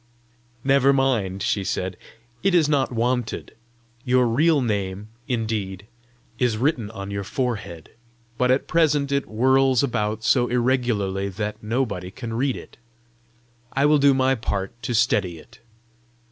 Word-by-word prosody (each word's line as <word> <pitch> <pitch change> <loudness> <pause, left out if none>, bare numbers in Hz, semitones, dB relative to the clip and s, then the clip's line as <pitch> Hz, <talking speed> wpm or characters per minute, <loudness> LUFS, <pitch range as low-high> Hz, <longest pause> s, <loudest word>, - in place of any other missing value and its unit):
"Never 140 0 +4
mind," 110 -9 0
she 100 -3 0
said; 95 -1 -2 0.5
"it 195 -2 +2
is 160 -4 +4
not 145 -4 +1
wanted. 120 0 -2 0.5
Your 125 -1 +3
real 150 +6 +3
name, 100 -4 -2 0.2
indeed, 110 -5 -2 0.5
is 120 -4 +1
written 125 -4 0
on 100 -2 -7
your 100 0 -3
forehead, 100 - -4 0.4
but 125 +1 +1
at 130 +2 +2
present 150 -4 +2
it 140 0 +1
whirls 130 +3 +3
about 110 -4 -1
so 125 +1 +3
irregularly 120 -6 0
that 105 +2 -5
nobody 105 -5 -2
can 115 +3 -7
read 130 +3 0
it. - - -12 1.0
I 140 +1 +2
will 150 0 +5
do 140 -1 +5
my 130 0 +3
part 100 -5 -3
to 120 0 -2
steady 105 -6 +1
it. 80 - -17
120 Hz, 140 wpm, -23 LUFS, 100-135 Hz, 1.0 s, will